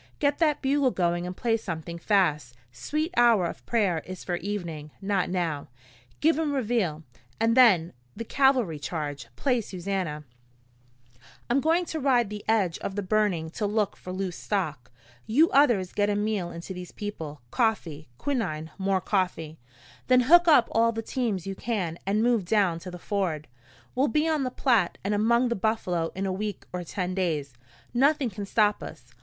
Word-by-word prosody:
Get 285 -1 +1
that 305 -4 +2
bugle 275 0 +3
going 175 -4 0
and 180 - -6
play 230 -2 +1
something 170 -5 -6
fast 150 - +1 0.2
Sweet 305 - -3
Hour 235 -6 +5
of 170 - -6
Prayer 200 -8 +1
is 185 0 -8
for 175 - -2
evening, 170 -6 -5
not 195 -2 0
now. 170 -5 -2 0.5
Give 320 +1 +3
'em 305 -3 0
Reveille, 215 - -1 0.4
and 225 +1 +2
then 195 -10 +5 0.2
the 230 - -5
cavalry 255 - +2
charge. 145 -4 -4
Play 250 - +1
Susannah. 185 -6 -4 1.3
"I'm 270 +3 +3
going 330 +4 +2
to 320 - -4
ride 245 -6 +2
the 210 -1 -6
edge 200 -7 +1
of 195 - -5
the 205 - -2
burning 185 -5 0
to 210 +4 -2
look 210 -1 0
for 180 - -9
loose 185 -1 -3
stock. 155 - -3 0.4
You 295 +10 +4
others 235 -10 +3
get 205 0 +1
a 205 - +1
meal 205 -4 -1
into 170 +2 -7
these 180 -1 -8
people 160 -10 -7
coffee, 170 - -1
quinine, 160 - -2
more 190 -1 +1
coffee. 175 -5 -2 0.5
Then 255 0 +5
hook 345 +7 +6
up 290 -7 +6
all 230 +1 +3
the 225 0 -4
teams 220 -8 -2
you 195 - -3
can 190 -6 -3
and 210 +3 +2
move 235 -4 +2
down 185 -3 +2
to 180 +2 -8
the 180 - -8
ford. 175 -6 -2 0.5
We'll 270 +3 +2
be 300 +7 +1
on 310 -4 +1
the - - -1
Platte 235 -8 +1
and 200 +2 0
among 235 +4 +3
the 235 - 0
buffalo 185 -5 -1
in 195 +1 -2
a 190 - -1
week 205 0 -4
or 180 0 -3
ten 180 +1 -3
days. 155 -8 -1 0.4
Nothing 270 0 +2
can 200 0 -6
stop 210 0 +2
us. - - -10
200 Hz, 175 wpm, -27 LUFS, 175-235 Hz, 1.3 s, hook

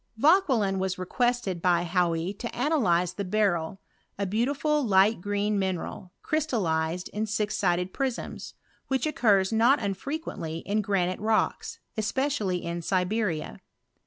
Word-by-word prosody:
Vauquelin 260 - +3
was 190 -1 -1
requested 210 -1 -1
by 175 -1 +3
Hauy 175 0 0
to 235 - -5
analyze 195 - +2
the 200 - -4
beryl, 190 -3 0 0.4
a 200 - -1
beautiful 280 +9 0
light 200 -2 +4
green 205 +1 0
mineral, 185 -1 -3
crystallized 180 - 0
in 215 +1 -2
sis'sided 190 -4 0
prisms, 265 -3 -4 0.3
which 265 0 0
occurs 215 -9 +2
not 235 +5 +5
unfrequently 200 - -4
in 210 +2 +1
granite 185 -3 0
rocks, 215 +1 0 0.2
especially 220 -5 -1
in 170 0 -3
Siberia. 180 - -1
200 Hz, 120 wpm, -27 LUFS, 180-235 Hz, 0.4 s, not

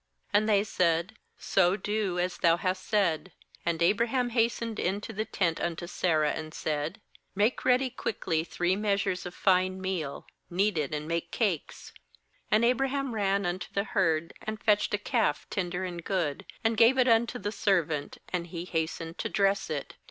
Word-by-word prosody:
' - - -36
And 215 +2 +3
they 205 -1 +4
said: 175 0 +1 0.2
'So 180 -1 +3
do, 210 -3 -1
as 180 0 -1
thou 170 -1 +4
hast 185 +1 -2
said.' 190 -4 +1 0.4
6And 170 0 +1
Abraham 235 +6 +2
has 230 -1 +2
tened 230 -2 -5
into 200 +3 -2
the 215 +2 -2
tent 170 -7 0
unto 170 0 -2
Sarah, 160 -4 +1
and 155 0 -6
said: 155 +6 -2 0.4
'Make 210 +5 +1
ready 255 0 +3
quickly 170 -9 -1
three 175 +2 0
measures 200 -3 0
of 180 - -9
fine 185 0 +2
meal, 185 -7 -3 0.2
knead 190 0 +1
it, 145 -3 -2
and 150 0 -3
make 170 +1 -2
cakes.' 195 -8 -2 0.6
7And 220 +2 +4
Abraham 270 +1 +1
ran 200 -2 +1
unto 180 +1 -3
the 200 - 0
herd, 165 -5 0
and 215 0 -5
fetched 210 -1 +2
a - - -1
calf 225 +2 0
tender 180 -1 -2
and 175 -2 -6
good, 165 -8 -2 0.2
and 225 0 +1
gave 235 +4 +6
it 255 -1 +4
unto 235 +1 +3
the 205 -4 -3
servant; 165 -9 0
and 175 -2 -2
he 170 0 -6
hastened 165 0 -3
to - - -2
dress 195 0 +1
it. 150 -2 -4
190 Hz, 175 wpm, -29 LUFS, 170-215 Hz, 0.6 s, gave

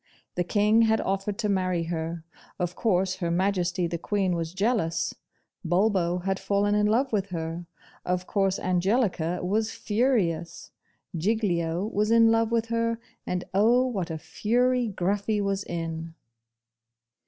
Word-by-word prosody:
The 180 - 0
King 210 +4 +3
had 220 -1 +3
offered 195 +1 -2
to 220 - -1
marry 185 -3 0
her; 165 0 -4 0.3
of 180 0 -2
course 185 -4 +1
Her 175 -3 -2
Majesty 180 0 +1
the 170 0 -3
Queen 195 -1 0
was 165 -1 -3
jealous: 185 -5 0 0.5
Bulbo 180 -1 +1
had 190 0 -1
fallen 200 +1 +1
in 210 0 +3
love 245 +4 +1
with 200 -2 +1
her; 170 -1 -5 0.4
of 180 0 -1
course 195 -1 +1
Angelica 185 -2 0
was 215 +4 0
furious: 205 -8 -1 0.4
Giglio 175 -2 0
was 210 0 0
in 230 0 +6
love 225 0 +2
with 230 -1 0
her, 230 0 0 0.3
and 180 0 -1
oh, 235 +6 +4
what 195 -9 -2
a 160 - -3
fury 245 +8 +1
Gruffy 200 +2 -1
was 200 0 -1
in! 165 -2 -5
195 Hz, 140 wpm, -26 LUFS, 175-220 Hz, 0.5 s, in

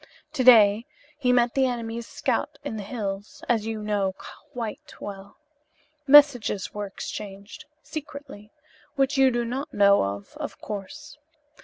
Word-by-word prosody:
To 270 -4 0
day 220 -3 +7 0.3
he 250 -3 +2
met 240 -1 +3
the 265 -1 +3
enemy's 235 -1 -4
scouts - - -2
in - - -4
the 215 - -4
hills, 200 -2 -5
as 225 -3 +1
you 220 -1 -4
know 200 -3 0 0.3
quite 230 -3 -7
well. 195 -1 -9 0.7
Messages 270 -8 +5
were 210 -1 -4
exchanged, 200 +7 -8 0.2
secretly, 285 -8 -9 0.4
which 275 0 +1
you 265 -1 +6
do 240 -1 -1
not 260 +5 -4
know 200 -1 +5
of, 100 +1 -5
of - - -6
course. 280 +10 -8
225 Hz, 140 wpm, -25 LUFS, 205-260 Hz, 0.7 s, day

